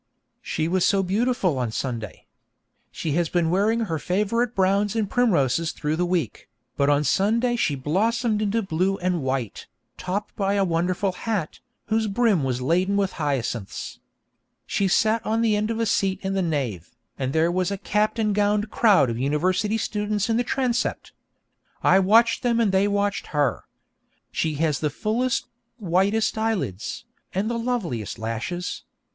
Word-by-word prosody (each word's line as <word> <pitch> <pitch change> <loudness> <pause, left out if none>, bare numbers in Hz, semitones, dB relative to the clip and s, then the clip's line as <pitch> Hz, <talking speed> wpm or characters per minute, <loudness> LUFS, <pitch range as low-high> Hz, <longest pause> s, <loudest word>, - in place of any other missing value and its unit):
She 160 0 -2
was 180 +1 +1
so 195 -1 +3
beautiful 195 - 0
on 120 -3 -1
Sunday. 115 -4 -5 0.7
She 160 - -3
has 165 +2 +1
been 170 -2 +1
wearing 215 +5 +2
her 165 -8 -2
favourite 210 +8 0
browns 195 +2 +2
and 220 -2 0
primroses 165 - +2
through 150 0 -2
the 175 +2 0
week, 170 - -2 0.3
but 140 0 +2
on 145 0 +3
Sunday 225 - +2
she 155 -11 0
blossomed 215 - 0
into 215 +2 0
blue 190 +2 0
and 180 -2 -1
white, 130 -5 -3 0.3
topped 195 +3 -4
by 200 0 0
a 200 -1 +2
wonderful 180 +3 0
hat, 195 -3 -3 0.3
whose 220 -1 0
brim 210 - +2
was 130 -1 -1
laden 185 +8 +1
with 195 -2 +1
hyacinths. 125 -7 -3 0.7
She 195 0 0
sat 220 +4 +2
on 225 +1 0
the 220 -2 +3
end 210 +1 0
of 225 0 -2
a 230 - +1
seat 195 -2 +1
in 190 0 -1
the 195 - +1
nave, 130 - -2 0.3
and 130 0 -1
there 160 +3 +2
was 185 0 0
a 200 - -3
capped 210 +2 0
and 215 -2 +1
gowned 210 +1 +1
crowd 205 - +4
of 115 - -4
university 185 - +1
students 210 0 -1
in - - +2
the 245 - +2
transept. 250 -2 -1 0.7
I 190 - +5
watched 225 +4 +4
them 235 -2 +1
and 220 -4 +2
they 190 +1 +3
watched 205 0 -1
her. 145 -3 +1 0.7
She 155 -2 -1
has 150 -1 0
the 150 - 0
fullest, 230 - -1 0.3
whitest 200 +3 +1
eyelids, 150 - -2 0.3
and 205 +5 0
the 235 - -2
loveliest 190 - -2
lashes. 115 +11 -4
195 Hz, 165 wpm, -24 LUFS, 160-215 Hz, 0.7 s, I